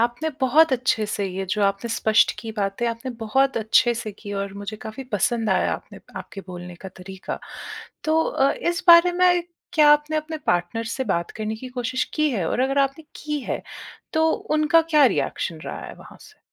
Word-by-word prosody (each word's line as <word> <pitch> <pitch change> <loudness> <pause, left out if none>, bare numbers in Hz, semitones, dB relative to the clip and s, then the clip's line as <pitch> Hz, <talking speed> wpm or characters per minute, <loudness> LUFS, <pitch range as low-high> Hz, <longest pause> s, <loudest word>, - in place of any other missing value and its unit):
आपने 240 +7 0
बहुत 285 +4 +5
अच्छे 245 -3 +1
से 205 -1 -2
ये 190 +1 -4
जो 210 +2 0
आपने 200 +4 0
स्पष्ट 220 -1 +3
कीं 225 -1 -6
बातें, 200 +3 -1
आपने 230 +3 -4
बहुत 265 +5 +2
अच्छे 230 +2 +3
से 225 -2 -5
की 205 0 -9
और 200 -1 -6
मुझे 205 +2 -6
काफ़ी 220 +5 -8
पसंद 220 +2 +1
आया 185 - +2
आपने - - -7 0.2
आपके 195 - -9
बोलने 180 -1 -8
का - - -4
तरीका। 190 0 -8 0.7
तो 315 +1 +3
अ, 275 +1 +2
इस 345 0 -2
बारे 340 +1 +8
में 355 0 +3 0.3
क्या 300 -2 +5
आपने 295 +1 +1
अपने 310 +1 -3
पार्टनर 175 +6 0
से 265 - -2
बात 170 -7 -1
करने 220 0 -4
की 255 +3 -8
कोशिश 255 +2 -1
की 305 -1 +2
है 190 -9 -1
और - - -1
अगर 270 +2 +1
आपने 275 +3 0
की 300 -1 -3
है, - - -4 0.5
तो 320 0 +3
उनका 305 +2 +2
क्या 300 -2 +6
रिएक्शन 165 -8 -2
रहा - - -6
है - - -9
वहाँ - - -15
से? - - -17
240 Hz, 195 wpm, -23 LUFS, 205-300 Hz, 0.7 s, बारे